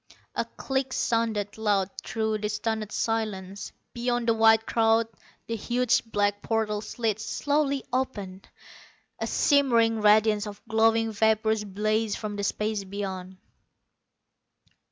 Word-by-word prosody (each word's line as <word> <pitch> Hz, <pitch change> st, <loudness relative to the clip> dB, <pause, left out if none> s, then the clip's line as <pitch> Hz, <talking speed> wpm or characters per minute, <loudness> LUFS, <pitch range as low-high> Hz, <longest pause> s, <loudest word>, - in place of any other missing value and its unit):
A -, -, -1 dB
click 265 Hz, -1 st, -3 dB
sounded 220 Hz, -3 st, -1 dB
loud 200 Hz, -3 st, +1 dB
through 220 Hz, -1 st, -1 dB
the 210 Hz, 0 st, -2 dB
stunned 220 Hz, 0 st, -2 dB
silence. 205 Hz, -4 st, -3 dB, 0.2 s
Beyond 240 Hz, 0 st, -1 dB
the 230 Hz, -, +5 dB
white 225 Hz, 0 st, +5 dB
crowd 225 Hz, 0 st, +3 dB, 0.4 s
the 230 Hz, -, -3 dB
huge 245 Hz, +2 st, +1 dB
black 205 Hz, -2 st, 0 dB
portal 220 Hz, -2 st, -1 dB
slid 220 Hz, -1 st, -2 dB
slowly 285 Hz, +3 st, 0 dB
open. 205 Hz, -8 st, -2 dB, 0.8 s
A -, -, -2 dB
shimmering 235 Hz, -6 st, +3 dB
radiance 210 Hz, 0 st, +4 dB
of 205 Hz, -1 st, -8 dB
glowing 225 Hz, 0 st, +3 dB
vapors 220 Hz, 0 st, +2 dB
blazed 215 Hz, +2 st, -1 dB
from 210 Hz, -1 st, -5 dB
the 200 Hz, -, -3 dB
space 210 Hz, 0 st, -1 dB
beyond. 190 Hz, -1 st, -6 dB
220 Hz, 120 wpm, -27 LUFS, 205-225 Hz, 0.8 s, the